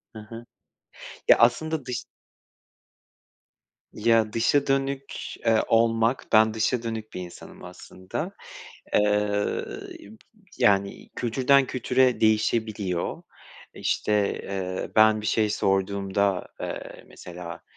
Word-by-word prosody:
He - - -7
he. 115 0 -8 0.8
Ya, - - +8
aslında 145 +4 +2
dış 125 -2 -4 1.9
Ya, 110 -1 +2
dışa 140 +5 +2
dönük, 135 0 -1 0.3
eee, 110 -1 +4
olmak 115 +1 +2
ben 110 0 +5
dışa 115 +2 0
dönük 110 -1 -5
bir 90 - -5
insanım 90 -1 -11
aslında. 95 0 -7 0.6
Eee, 105 0 +1 0.5
b 220 - -15 0.4
yani, 100 -1 +1
kültürden 130 +3 +3
kültüre 125 -1 +1
değişebiliyor. 110 -4 0 0.5
İşte, 105 -1 0
eee, 95 -1 -4
ben 110 0 +5
bir 105 - -5
şey 110 -1 +1
sorduğumda, 100 -1 0
eee, - - -7
mesela, 85 -1 -9
110 Hz, 100 wpm, -25 LUFS, 100-120 Hz, 1.9 s, Ya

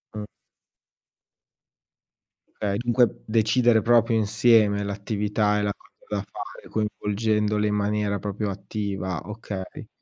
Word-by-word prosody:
Mh. 105 -1 -4 2.3
Okay, 100 -1 -1
dunque, 120 0 +2
decidere 115 +1 +3
proprio 115 0 +4
insieme 110 -1 +4
l'attività 105 +1 0
e - - 0
la 100 0 0
cosa 105 - -10
da - - -1
fare, - - -9
coinvolgendole 105 0 0
in 105 - 0
maniera 105 -1 0
proprio 105 +1 -3
attiva, 95 -3 -4
okay. 105 -3 -7
105 Hz, 110 wpm, -25 LUFS, 100-110 Hz, 2.3 s, proprio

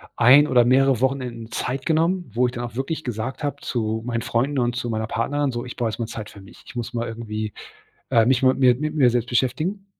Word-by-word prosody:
1 135 +5 +7
oder 125 -4 +4
mehrere 130 -1 +3
Wochenenden 125 -4 -2
Zeit 130 +2 -3
genommen, 170 +2 +1
wo 125 +2 +2
ich 125 - -1
dann 120 - -4
auch 120 -1 -7
wirklich 150 +5 -3
gesagt 125 +4 -4
habe 145 - -2
zu 110 -2 -2
meinen 120 -1 -2
Freunden 130 +5 0
und 120 -1 0
zu 120 -1 -3
meiner 110 -1 -2
Partnerin: 140 +5 -1
„So, 120 +1 -4
ich 125 - -8
brauche 120 -2 -1
erst 110 - -6
mal 115 - -1
Zeit 110 -1 -7
für 100 - -13
mich. 95 - -16
Ich 145 - -13
muss 120 -1 -4
mal 120 0 -2
irgendwie, 110 -2 -5 0.6
äh, 115 -1 +4
mich 130 +1 +3
mal 130 0 +5
mit - - -7
mir 125 -2 +6
mit 155 +4 -3
mir 135 -5 +4
selbst 120 0 -1
beschäftigen.“ 155 - -1
125 Hz, 245 wpm, -23 LUFS, 115-135 Hz, 0.6 s, 1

